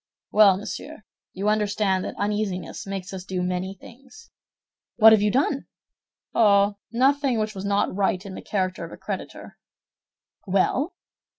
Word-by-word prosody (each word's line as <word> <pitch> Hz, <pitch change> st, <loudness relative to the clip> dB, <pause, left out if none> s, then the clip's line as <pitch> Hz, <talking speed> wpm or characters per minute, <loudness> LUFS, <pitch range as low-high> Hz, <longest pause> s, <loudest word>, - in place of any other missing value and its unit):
"Well, 205 Hz, -3 st, +6 dB
monsieur, 250 Hz, +6 st, -7 dB, 0.3 s
you 195 Hz, +2 st, -3 dB
understand 205 Hz, -3 st, +1 dB
that -, -, -5 dB
uneasiness 205 Hz, -3 st, -3 dB
makes 195 Hz, -1 st, -5 dB
us 185 Hz, -1 st, -6 dB
do 185 Hz, -1 st, -3 dB
many 180 Hz, +1 st, -2 dB
things." 270 Hz, -, -16 dB, 0.6 s
"What 220 Hz, -1 st, +8 dB
have 220 Hz, -2 st, +5 dB
you 210 Hz, -, +3 dB
done?" 275 Hz, +4 st, 0 dB, 0.7 s
"Oh, 200 Hz, -2 st, +4 dB
nothing 265 Hz, +1 st, +2 dB
which 215 Hz, 0 st, -1 dB
was 195 Hz, -1 st, -6 dB
not 200 Hz, -2 st, 0 dB
right 195 Hz, -1 st, 0 dB
in 195 Hz, -, -7 dB
the -, -, -7 dB
character 185 Hz, -2 st, -2 dB
of -, -, -8 dB
a -, -, -9 dB
creditor." -, -, -7 dB, 0.9 s
"Well?" 225 Hz, -, +1 dB
205 Hz, 150 wpm, -24 LUFS, 190-220 Hz, 0.9 s, What